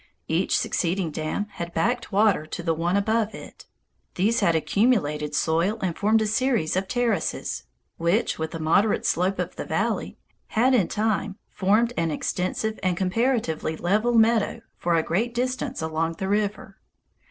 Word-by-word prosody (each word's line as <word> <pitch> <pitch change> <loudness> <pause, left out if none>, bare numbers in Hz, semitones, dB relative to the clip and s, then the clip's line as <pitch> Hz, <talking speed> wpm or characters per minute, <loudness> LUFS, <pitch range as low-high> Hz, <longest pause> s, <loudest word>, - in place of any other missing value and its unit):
Each - - +1
succeeding 175 -1 -1
dam 155 +7 -2
had 170 -4 -7
backed 235 +8 0
water 200 -6 +3
to 175 - -6
the 165 -1 +1
one 170 +4 0
above 220 +1 0
it. - - -12 0.5
These 215 +6 +2
had 170 - +3
accumulated 155 - +1
soil 170 +8 +1
and 185 -4 -2
formed 220 +2 +2
a - - -1
series 220 -6 +1
of 190 +1 -1
terraces, 235 -8 -1 0.3
which, 170 +5 +1
with 160 0 -2
the 165 - -6
moderate 190 +7 +2
slope 185 +3 +1
of - - -3
the - - -3
valley, - - -2 0.3
had 250 +4 +2
in 205 -9 +3
time 210 -2 -1
formed 215 +5 +2
an 165 -1 +1
extensive 185 +7 -2
and 185 -2 0
comparatively 190 -5 0
level 215 +7 +1
meadow 225 0 +3
for 175 -1 0
a 165 - +2
great 230 +10 -1
distance 255 - -2
along 160 +1 -1
the 190 +4 -4
river. 205 0 -1
195 Hz, 160 wpm, -25 LUFS, 165-220 Hz, 0.5 s, water